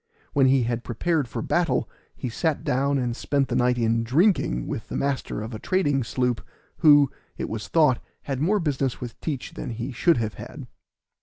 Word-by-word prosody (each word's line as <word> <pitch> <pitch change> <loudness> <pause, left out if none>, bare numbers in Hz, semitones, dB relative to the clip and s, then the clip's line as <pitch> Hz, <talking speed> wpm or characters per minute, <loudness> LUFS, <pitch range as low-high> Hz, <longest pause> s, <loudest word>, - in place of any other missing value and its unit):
When 135 -2 +4
he 130 -1 +4
had 120 0 -2
prepared 150 +4 0
for 110 - -4
battle 165 -7 +1 0.3
he - - -4
sat 150 +6 -1
down 140 +2 +1
and 120 -3 -1
spent 140 +1 0
the 125 - -1
night 125 0 +2
in 115 -1 +1
drinking 125 - +2
with - - -5
the - - -3
master 140 -6 -2
of 110 +2 -6
a 110 - -5
trading 145 - +1
sloop, 125 -2 -1 0.4
who, 145 -4 +6 0.3
it - - -3
was 110 -2 -5
thought, 150 -7 +3 0.2
had 135 -2 -3
more 200 +7 +3
business 135 -6 -1
with 120 -2 -8
Teach 145 -6 -4
than 140 - -6
he 120 +3 -4
should 165 +7 +3
have 110 -2 -1
had. - - -8
130 Hz, 190 wpm, -25 LUFS, 120-145 Hz, 0.4 s, who